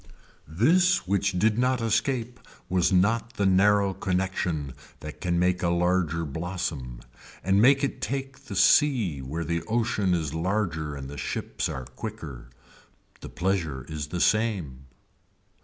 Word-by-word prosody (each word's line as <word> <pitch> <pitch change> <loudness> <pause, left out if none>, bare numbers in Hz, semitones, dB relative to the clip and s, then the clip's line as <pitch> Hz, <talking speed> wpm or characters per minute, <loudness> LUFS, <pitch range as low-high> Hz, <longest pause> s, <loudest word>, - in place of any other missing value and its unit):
This 175 - +3
which 100 +1 +1
did 110 +4 +2
not 125 0 +2
escape 120 +1 -1 0.3
was 90 -1 +2
not 115 +5 +2
the 100 - -1
narrow 100 +1 +4
connection 90 -7 -2 0.3
that 75 0 -9
can 85 -1 0
make 90 0 +1
a 85 - +1
larger 85 -2 +1
blossom 75 -6 -4 0.4
and 95 +2 +3
make 135 +4 +5
it 140 - -2
take 135 -1 -4
the 100 - -7
sea 105 - +4
where 75 +6 -4
the 85 +1 -1
ocean 110 -5 +1
is 80 -4 -2
larger 80 -4 -1
and 70 -1 -7
the 70 +1 -8
ships - - -3
are 65 -1 -5
quicker. - - -8 0.7
The - - -9
pleasure 85 -8 -2
is 75 -1 -5
the 85 +4 -4
same. 90 - 0
90 Hz, 140 wpm, -26 LUFS, 80-110 Hz, 0.7 s, make